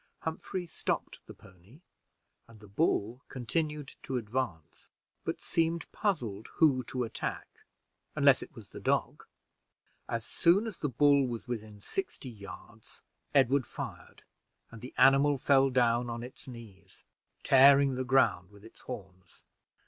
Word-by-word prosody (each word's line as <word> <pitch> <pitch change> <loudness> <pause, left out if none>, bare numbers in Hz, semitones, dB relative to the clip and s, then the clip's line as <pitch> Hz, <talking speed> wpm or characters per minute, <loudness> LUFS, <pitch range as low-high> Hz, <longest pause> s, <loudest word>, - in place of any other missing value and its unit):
Humphrey 175 +3 -4
stopped 170 - -4
the - - -9
pony 95 - -19 0.7
and 115 -2 -16
the 105 - -14
bull 115 0 0
continued 150 +3 -3
to 130 - -3
advance, 110 - -4 0.3
but - - -3
seemed 165 -1 -1
puzzled 120 - -2
who 140 -6 +4
to 125 +1 -3
attack, 115 - -6 0.5
unless - - +5
it - - -10
was - - -12
the - - -9
dog. - - -1 0.8
As 115 -1 -2
soon 180 +6 +3
as 220 -5 -6
the 150 - -1
bull 140 +1 +4
was 120 -1 -6
within 110 -3 -6
sixty 365 - -5
yards, 110 +2 -12 0.3
Edward 135 -1 +4
fired, - - -8 0.5
and 115 -1 -11
the 125 - -10
animal 140 +1 +5
fell 135 +1 +4
down 120 -1 +2
on 115 0 -5
its 125 +2 -11
knees, 105 -6 -12 0.4
tearing 135 0 +6
the 130 0 -2
ground 130 -8 +2
with 100 +1 -17
its 115 - -15
horns. 95 -7 -10
125 Hz, 140 wpm, -30 LUFS, 110-140 Hz, 0.8 s, tearing